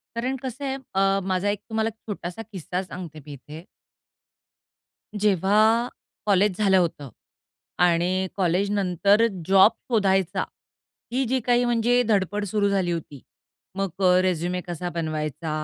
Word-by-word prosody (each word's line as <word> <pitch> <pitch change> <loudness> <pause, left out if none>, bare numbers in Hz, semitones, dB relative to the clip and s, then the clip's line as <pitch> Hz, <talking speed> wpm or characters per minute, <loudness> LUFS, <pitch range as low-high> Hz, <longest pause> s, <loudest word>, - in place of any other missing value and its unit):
कारण 255 +3 -1
कसं 260 +2 -5
आहे 265 -1 -1 0.2
अ, 195 0 +3
माझा 190 +1 0
एक 205 - -1
तुम्हाला 220 0 0
छोटासा 205 -3 -7
किस्सा 180 -1 -4
सांगते 170 -4 -8
मी 150 - -9
इथे. 150 +4 -11 1.5
जेव्हा 210 +4 +3 0.4
कॉलेज 200 -2 +3
झालं 195 -3 +4
होतं 160 -6 -1 0.7
आणि 180 +2 +2
कॉलेजनंतर 200 +2 +2 0.2
जॉब 195 +3 +7 0.2
शोधायचा, 195 -5 +2 0.7
ही 260 +2 +1
जी 260 +2 0
काही 245 0 +3
म्हणजे 240 +1 +2
धडपड 205 -1 +1
सुरू 200 +1 +1
झाली 190 -3 0
होती. 150 -5 -5 0.5
मग 195 0 -1
अ, 180 0 +5
रेझ्युमे 180 0 -1
कसा 175 +1 -4
बनवायचा 155 -2 -3
195 Hz, 125 wpm, -24 LUFS, 175-215 Hz, 1.5 s, जॉब